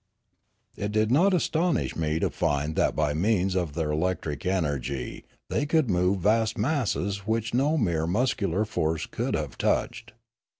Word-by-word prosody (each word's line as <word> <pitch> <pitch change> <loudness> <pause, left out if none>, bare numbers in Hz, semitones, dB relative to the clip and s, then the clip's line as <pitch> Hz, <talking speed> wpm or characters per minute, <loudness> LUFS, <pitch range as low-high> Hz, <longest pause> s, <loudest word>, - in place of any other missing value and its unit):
It 105 0 -3
did 110 +1 +1
not 175 +9 +4
astonish 175 -1 +1
me 80 -1 0
to - - 0
find 75 +2 -1
that - - +1
by 75 -2 +1
means 95 +3 +1
of 90 -5 -1
their 80 -1 -1
electric 80 0 -2
energy 70 -8 -2 0.3
they 145 - 0
could 155 -6 +2
move 90 +1 +1
vast 110 +3 +2
masses 105 -6 -1
which 115 0 -1
no. 145 +6 +2
mere 85 - 0
muscular 105 -2 0
force 80 -6 -1
could - - -2
have - - -4
touched. - - -1
95 Hz, 155 wpm, -26 LUFS, 80-115 Hz, 0.3 s, not